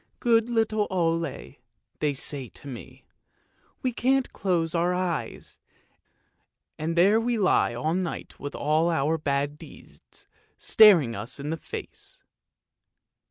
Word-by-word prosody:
' - - -45
Good 230 -1 +2
little 220 -2 +1
Ole,' 165 - -2 0.4
they 150 -1 0
say 135 -2 0
to - - -12
me, 125 -5 -10 0.4
' - - -39
we 255 -2 0
can't 260 +2 +1
close 170 -4 -1
our 175 +1 +1
eyes, 180 -3 -4 1.2
and 160 +2 -2
there 195 +6 +5
we 240 0 0
lie 185 - +2
all 155 +7 -1
night 180 -1 -4
with 145 0 -6
all 155 +3 +1
our 160 0 0
bad 145 0 -2
deeds - - -16 0.3
staring 175 - +5
us 105 +7 -6
in 145 +2 -4
the 165 - -2
face. - - -9
165 Hz, 135 wpm, -26 LUFS, 145-205 Hz, 1.2 s, there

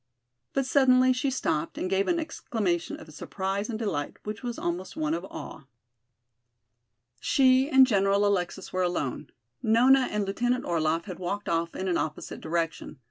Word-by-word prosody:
But 270 - +1
suddenly 255 -1 +5
she 255 +2 0
stopped 165 -11 -2
and - - -2
gave 195 +1 +1
an 345 -1 +2
exclamation 215 - -2
of 155 -1 -12
surprise 195 +6 -3
and 225 - -2
delight 170 -11 -3
which 210 0 -5
was 240 -2 -4
almost 175 +2 -4
one 155 0 0
of 170 +2 -2
awe. 160 -5 -9 1.5
She 270 -4 +4
and 265 -3 +7
General 200 -3 +2
Alexis 190 -1 -1
were 185 - 0
alone. 175 -8 -2 0.3
Nona 255 +4 +5
and 210 -1 -1
Lieutenant 245 +5 0
Orlaff 165 -1 0
had 185 -4 -7
walked 200 +3 -3
off 165 0 -1
in 190 - -3
an 180 - +1
opposite 150 -1 -5
direction. 165 -2 -3
200 Hz, 160 wpm, -27 LUFS, 170-255 Hz, 1.5 s, and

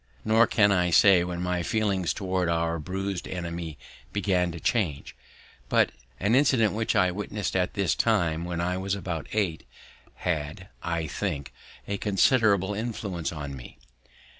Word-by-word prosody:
Nor 110 +1 +5
can 100 -2 +4
I 90 -2 +2
say 90 +1 +6
when 90 0 -4
my 90 -1 0
feelings 100 -2 0
towards 95 -3 -1
our 85 0 0
bruised 95 +3 -4
enemy 85 -3 -5 0.3
began 90 -3 +1
to 85 - -7
change; 80 - -1 0.5
but - - +3 0.3
an 100 +4 +1
incident 130 -5 +4
which 110 +1 -1
I 90 -1 +4
witnessed 105 +1 -4
at 90 -1 0
this 100 -5 +1
time, 80 -1 +1
when 85 -1 -3
I 90 +1 0
was 95 +1 -1
about 90 -5 -5
eight, 95 -7 -1 0.5
had, 80 +2 -3
I 85 -1 -2
think, 75 -4 -4 0.3
a 100 - -2
considerable 105 -1 +3
influence 100 -6 -3
on 70 -4 -6
me. 65 - -11
90 Hz, 150 wpm, -27 LUFS, 85-100 Hz, 0.5 s, say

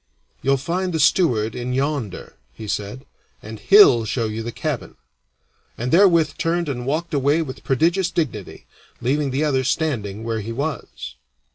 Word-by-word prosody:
"You'll 135 +2 +2
find 175 +6 -2
the 160 - -1
steward 120 - +2
in 125 +1 -4
yonder," 135 -6 -3 0.2
he 110 - -9
said, 105 +7 -4 0.4
"and 110 0 -8
he'll 195 - +6
show 115 +2 -2
you 110 +1 -4
the 120 +1 -5
cabin," - - -4 0.8
and 125 +2 -3
therewith 170 -4 +4
turned 170 0 0
and 125 -3 -4
walked 160 +4 -2
away 145 +3 +2
with 130 -3 -9
prodigious 170 +7 +1
dignity, 125 - -4 0.3
leaving 140 +4 0
the 135 +3 -1
other 135 -3 +1
standing 115 -8 -2
where 115 -1 -2
he 110 +3 -6
was. 125 - -5
135 Hz, 155 wpm, -21 LUFS, 115-160 Hz, 0.8 s, he'll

